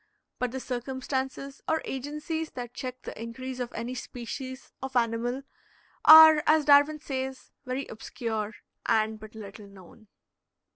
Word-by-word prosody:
But 250 - 0
the 265 +2 -5
circumstances 265 +2 -4
or 320 0 +1
agencies 300 +4 -4
that 245 -2 -6
check 255 -1 -6
the - - -6
increase 255 +3 -6
of 245 -1 -3
any 235 +2 -4
species 255 +1 -7
of 265 -1 -6
animal 240 +2 0 0.6
are, 315 -1 +11
as 310 -1 +4
Darwin 290 +1 +6
says, 265 -2 -5 0.2
very 255 +2 -2
obscure 220 -1 -4 0.3
and 220 -1 +2
but 215 +1 -12
little 205 -1 -10
known. 200 +3 -16
255 Hz, 135 wpm, -28 LUFS, 230-275 Hz, 0.6 s, are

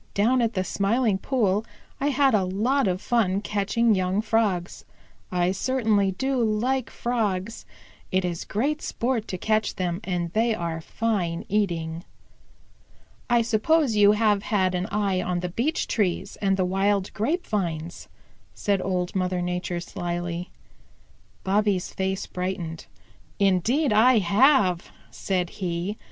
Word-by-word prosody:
Down 240 +5 +3
at 230 -1 0
the 185 - +1
Smiling 205 +2 +1
Pool 210 -4 +1 0.4
I 280 - 0
had 275 -2 +3
a 205 -3 +3
lot 215 +8 +1
of 185 +1 -1
fun 200 -5 +1
catching 210 +3 +1
young 185 0 0
Frogs. 210 -5 0 0.5
I 180 0 +1
certainly 210 -2 +1
do 265 +4 0
like 230 +4 0
Frogs. 220 -4 -2 0.4
It 185 0 +1
is 170 -2 -3
great 290 +8 -1
sport 235 -2 -2
to 185 - -4
catch 215 +3 0
them, 180 -1 -2
and 175 -2 -2
they 225 +1 +2
are 165 -3 -3
fine 180 -4 -2
eating." 170 -5 -1 1.3
"I 240 -1 +4
suppose 240 +4 +2
you 205 0 +6
have 210 -2 +2
had 190 -4 +1
an 180 +1 -1
eye 200 -3 0
on 180 -1 -2
the 180 - -3
beech 255 - -1
trees 195 -6 -1
and 195 -1 +1
the 185 - +1
wild 195 +1 0
grape 300 - -1
vines," 170 -5 -3 0.5
said 200 -2 0
Old 180 -1 -2
Mother 185 -1 0
Nature 180 0 -2
slyly. 175 0 -4 0.9
Bobby's 200 -1 +1
face 190 0 -2
brightened. 180 -3 -4 0.5
"Indeed 210 - +2
I 235 +3 +6
have," 200 - +3 0.2
said 180 -3 -2
he. 180 +3 -2
200 Hz, 140 wpm, -25 LUFS, 180-225 Hz, 1.3 s, you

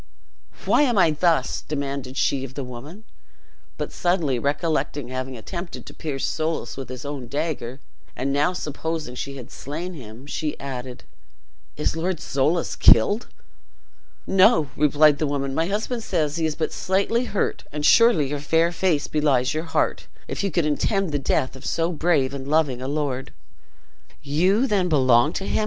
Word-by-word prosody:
"Why - - +4
am 245 -7 +2
I 170 -4 +5
thus?" 155 -3 +1
demanded 140 -3 -4
she 135 -2 +1
of 135 0 -8
the 140 - -3
woman; 135 - -9 0.7
but - - -4
suddenly 170 -8 0
recollecting 145 -1 -1
having 130 0 -4
attempted 170 - -7
to - - -10
pierce 145 -4 -3
Soulis 160 +1 -2
with 135 -2 -7
his 130 +1 -7
own 140 -4 -5
dagger, 140 -3 -3 0.4
and 135 +2 -1
now 145 +5 +2
supposing 160 -4 -4
she 140 +2 -5
had 125 0 -10
slain 170 +6 -6
him, 120 -4 -10
she 150 +1 -3
added, 130 -2 -6 0.7
"Is 150 - 0
Lord 170 +1 -1
Soulis 150 +6 0
killed?" 205 - +5 1.0
"No," 185 - +4
replied 150 0 +4
the 155 - +1
woman; 140 -1 -2
"my 165 +4 +1
husband 220 +4 -2
says 155 -7 -1
he 160 -1 +1
is 155 - -3
but 160 - -2
slightly 200 +6 +1
hurt; 205 - -2
and 150 0 -3
surely 230 - +6
your 145 0 -2
fair 165 +4 +2
face 170 -4 +1
belies 140 -4 +1
your 155 +2 -2
heart, 160 - -1 0.2
if - - -3
you 200 - +1
could 170 -2 0
intend 185 +5 0
the 145 - 0
death 135 -1 0
of 130 - -12
so 165 +1 0
brave 155 -5 +1
and 135 -1 -6
loving 145 -4 +1
a 130 - -4
lord!" 140 -3 -2 0.9
"You 180 - +2
then 195 -7 +1
belong 130 -2 +4
to 195 - -3
him?" - - 0
150 Hz, 170 wpm, -23 LUFS, 135-170 Hz, 1.0 s, surely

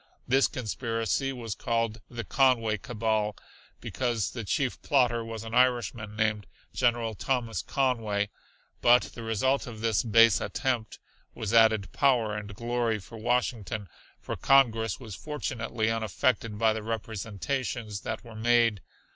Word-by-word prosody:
This 135 +2 +4
conspiracy 115 +3 -2
was 115 -5 -5
called 115 0 -1
the 120 -1 -5
Conway 115 -3 +2
Cabal, 110 -4 -1 0.4
because 120 -5 -2
the 115 - -5
chief 130 +5 -1
plotter 120 -4 +2
was 115 -1 -6
an 115 0 -8
Irishman 120 -4 +1
named 105 -2 0 0.3
General 120 -2 +1
Thomas 115 +1 -1
Conway. 110 -7 0 0.5
But 120 +1 +6
the 120 - -8
result 115 +5 0
of 110 -3 -8
this 115 -4 +2
base 115 -2 +5
attempt 125 -5 -2 0.4
was 110 0 -3
added 110 -3 +4
power 120 -6 +2
and 105 -1 -6
glory 120 0 0
for 105 +3 -11
Washington, 115 -3 -1 0.3
for - - -5
Congress 115 -5 +3
was 115 -5 -9
fortunately 115 - -2
unaffected 115 0 0
by 110 0 +3
the 110 - -4
representations 110 +1 -4
that 110 +1 -4
were 115 -2 -12
made. 115 -2 +2
115 Hz, 135 wpm, -28 LUFS, 110-125 Hz, 0.5 s, But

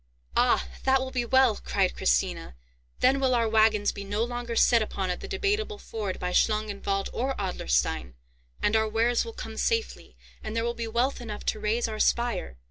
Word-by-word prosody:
"Ah! - - +3 0.2
that 265 0 +4
will 260 0 -4
be 245 -2 -1
well," 260 -3 +4
cried - - 0
Christina. - - 0 0.5
"Then 265 +2 +4
will 260 -2 +2
our 230 -1 +2
wagons 215 -1 +3
be 200 - -7
no 205 +3 -1
longer 240 -1 -4
set 230 0 +5
upon 195 -3 -2
at 180 - -4
the - - -7
Debateable 415 +2 -1
Ford 210 - -5
by 180 - -2
Schlangenwald 200 -2 0
or 265 +3 -1
Adlerstein; 65 - -1 0.5
and 210 - +2
our 220 0 +2
wares 230 +2 +2
will 460 - -7
come - - -8
safely, 455 -1 -2 0.3
and 215 +1 -5
there 230 - 0
will 235 0 -1
be 235 -1 -4
wealth 245 +4 0
enough 215 -3 -7
to 215 - -1
raise 215 +3 0
our 215 -1 -5
spire! 235 - 0
225 Hz, 190 wpm, -27 LUFS, 205-245 Hz, 0.5 s, set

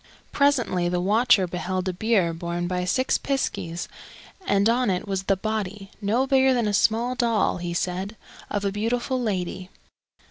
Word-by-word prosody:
Presently 245 -11 +2
the 180 0 0
watcher 210 +2 +4
beheld 185 +1 -3
a 185 - -1
bier 190 -3 +1
borne 170 +1 -3
by 180 0 -1
six 260 +8 +1
piskies, 195 -11 -2 0.6
and 200 +1 +3
on 240 0 +2
it 185 +2 -1
was 195 -1 -2
the 195 -1 +2
body 205 -1 -4
no 225 +6 +1
bigger 265 -1 +4
than 235 -3 +1
a 205 - 0
small 225 +4 +2
doll, 235 -6 +1
he 175 -1 -4
said 185 +5 -2 0.3
of 205 -1 -2
a 200 - +1
beautiful 240 +5 -1
lady. 185 -4 -3
200 Hz, 165 wpm, -24 LUFS, 180-235 Hz, 0.6 s, watcher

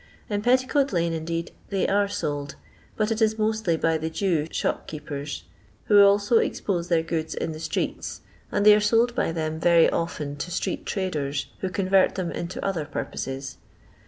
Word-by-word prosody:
In 205 0 0
Petticoat 255 +4 +2
lane, 170 -2 +1
indeed, 165 +1 -3 0.2
they 195 -2 0
are 200 +1 +2
sold, 145 -7 -3 0.4
but 215 +1 +1
it 225 +1 -1
is 220 0 +3
mostly 215 -5 +1
by 160 0 +1
the 160 +1 -2
Jew 165 -3 0
shopkeepers, 150 -2 -4 0.4
who 205 -1 +6
also 200 +3 +4
expose 175 -4 -1
their 165 -2 +2
goods 160 -1 -3
in - - -2
the 155 - -7
streets, 165 - -3 0.3
and 205 - +1
they 210 - +10
are 210 - +5
sold 230 +3 +3
by 235 - 0
them 160 -1 -3
very 170 0 +5
often 150 -4 -3
to 145 - -4
street 180 - -3
traders, 145 -7 -2
who 190 - -2
convert 190 0 +2
them 180 -3 -2
into 175 +2 -5
other 190 -6 -1
purposes. 135 -1 -5
175 Hz, 170 wpm, -25 LUFS, 160-205 Hz, 0.4 s, they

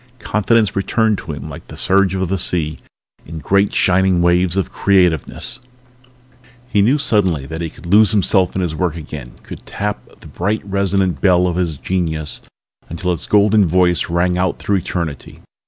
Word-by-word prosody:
Confidence 105 -1 +1
returned 105 +2 +1
to - - -7
him 75 - -7
like - - -10
the - - -10
surge 95 -1 +2
of 95 -1 -1
the 95 +2 -2
sea 80 -3 0 0.4
in 80 +1 -9
great 100 +5 +1
shining 95 -1 +2
waves 90 +1 +2
of 95 - -1
creativeness. 90 -6 0 1.1
He 105 -5 +1
knew 125 +9 +3
suddenly 95 - +1
that 80 +3 -6
he 85 - -3
could 80 - -16
lose 105 +4 +5
himself 95 -3 +1
in 95 - 0
his 85 -3 -2
work 85 0 -2
again, 75 -6 -8
could - - -10
tap 105 0 -5
the - - -15
bright 105 +5 -2
resonant 95 -3 0
bell 90 -2 +4
of 90 -2 -1
his 85 -5 -1
genius 80 -3 -3 0.5
until 90 +2 -2
its 85 - -6
golden 105 -1 +4
voice 90 0 +2
rang 90 +1 0
out 95 -1 0
through 100 - 0
eternity. 85 -5 -5
90 Hz, 170 wpm, -17 LUFS, 85-100 Hz, 1.1 s, lose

